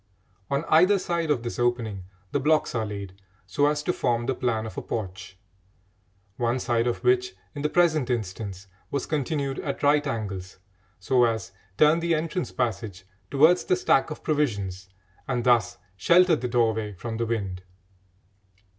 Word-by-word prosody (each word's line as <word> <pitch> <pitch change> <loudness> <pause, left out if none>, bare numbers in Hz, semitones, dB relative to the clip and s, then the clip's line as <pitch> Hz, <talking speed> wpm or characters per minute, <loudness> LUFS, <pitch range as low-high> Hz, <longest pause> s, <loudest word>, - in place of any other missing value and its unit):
On 140 +3 -1
either 185 +6 +5
side 170 -3 -2
of 130 -6 +1
this 120 - -5
opening 115 -6 -1 0.3
the 145 - +1
blocks 155 +3 +2
are 110 -3 -1
laid 100 -2 -6 0.3
so 120 +11 +1
as 150 0 0
to 180 - 0
form 120 -5 0
the 135 - 0
plan 115 -3 -1
of 110 - -8
a - - -3
porch, 95 -3 -6 1.0
one 120 +1 0
side 120 -1 0
of 120 - -2
which, 375 0 +2 0.2
in 145 - -6
the 150 - 0
present 155 -5 +2
instance, 100 -4 -4 0.2
was 140 - -2
continued 145 -2 -2
at 140 0 -4
right 145 +1 +3
angles 100 -7 -4 0.4
so 125 +6 +3
as 115 -3 -2 0.3
turn 155 +5 +5
the 170 0 +1
entrance 165 +3 -2
passage 110 -6 -3 0.3
towards 155 +6 +5
the 185 - +3
stack 155 -6 +2
of 150 - -8
provisions 100 -11 -1 0.4
and 125 -2 -1
thus 120 -1 +3 0.2
shelter 170 - +5
the 125 -4 -3
doorway 110 -3 0
from 110 +4 -6
the 115 0 -1
wind. 100 -5 -3
125 Hz, 165 wpm, -26 LUFS, 110-150 Hz, 1.0 s, either